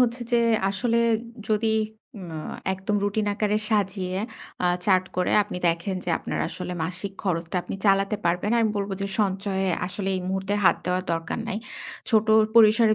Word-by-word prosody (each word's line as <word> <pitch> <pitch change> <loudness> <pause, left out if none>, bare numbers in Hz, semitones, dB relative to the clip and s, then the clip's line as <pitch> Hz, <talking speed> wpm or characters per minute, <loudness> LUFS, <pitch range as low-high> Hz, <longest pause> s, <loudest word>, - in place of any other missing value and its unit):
হচ্ছে 245 0 +2
যে 240 - +5 0.3
আসলে 230 +4 +1 0.5
যদি 215 +1 +2 0.5
উমা 170 -4 -7 0.4
একদম 195 +2 -1
রুটিন 210 +1 0
আকারে 210 0 +1
সাজিয়ে, 190 -3 0 0.5
আ - - +4 0.2
চার্ট 185 -2 +4
করে 180 - +1
আপনি 205 -2 -7
দেখেন 170 +3 -1
যে 175 - -1
আপনার - - -4
আসলে 180 +1 -5
মাসিক 185 +4 -3
খরচটা 170 -2 -1
আপনি - - -6
চালাতে 195 +2 +3
পারবেন, 175 +4 +1
আমি 220 - +3
বলব 200 0 -2
যে, 200 - -1
"সঞ্চয়ে 195 -1 0 0.2
আসলে 195 +1 -4
এই - - -2
মুহূর্তে 190 +1 -1
হাত 170 - +6
দেওয়া 180 0 +1
দরকার 165 +5 -2
নাই।" 215 - -2 0.5
ছোট 220 -1 +4 0.3
পরিসরে 220 0 +6
195 Hz, 160 wpm, -25 LUFS, 185-210 Hz, 0.5 s, হাত